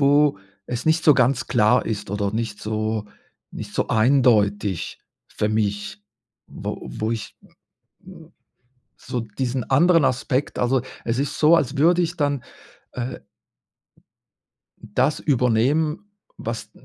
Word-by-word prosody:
wo 145 -4 +4 0.3
es 120 -1 -4
nicht 160 +1 +2
so 150 - +7
ganz 130 0 +2
klar 110 -3 +3
ist 105 -3 -4
oder 100 -1 -1
nicht 110 -2 -3
so 110 0 -2 0.4
nicht - - -8
so - - 0
eindeutig 110 -6 +2 0.3
für 105 - -2
mich, 105 -1 -2 0.4
wo - - -6
wo 110 +1 -3
ich, 115 - -6
m - - -20 0.6
m - - -13 0.7
so 125 - -4
diesen 120 +3 -3
anderen 165 +4 +4
Aspekt 130 +1 -1
also, 125 +1 +2 0.2
es 115 +2 -1
ist 140 +1 -2
so, 155 +2 +6
als 145 -2 -1
würde 170 +5 +4
ich 170 +1 -2
dann, 145 -3 0 0.5
äh 125 +1 -5 1.6
das 125 +7 0
übernehmen, 145 - +1 0.3
was - - -5
125 Hz, 130 wpm, -22 LUFS, 110-145 Hz, 1.6 s, so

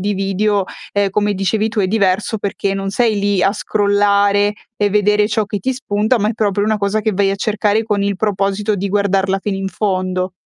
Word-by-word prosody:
di 205 +2 -1
video, 195 +1 0 0.3
ehm, 200 -1 +1
come 205 +1 0
dicevi 200 +3 0
tu, 225 - -5
è 190 - +2
diverso 200 +2 +1
perché 200 -1 -2
non 195 0 -3
sei 225 +1 +1
lì 200 -2 +1
a 195 - +3
scrollare 205 0 +2 0.2
e 205 - +1
vedere 210 +1 +2
ciò 215 0 0
che 205 0 -4
ti 260 +8 -1
spunta, 220 -1 0
ma 210 0 +1
è - - 0
proprio 205 -2 0
una 215 0 0
cosa 200 +1 0
che 215 0 0
vai 195 +1 +1
a - - 0
cercare 210 +1 0
con 210 -2 -1
il 200 -1 -1
proposito 200 +1 0
di 200 +1 -2
guardarla 195 -1 +1
fino 200 0 -2
in 195 0 -3
fondo. 185 -2 -2
205 Hz, 210 wpm, -17 LUFS, 195-210 Hz, 0.3 s, a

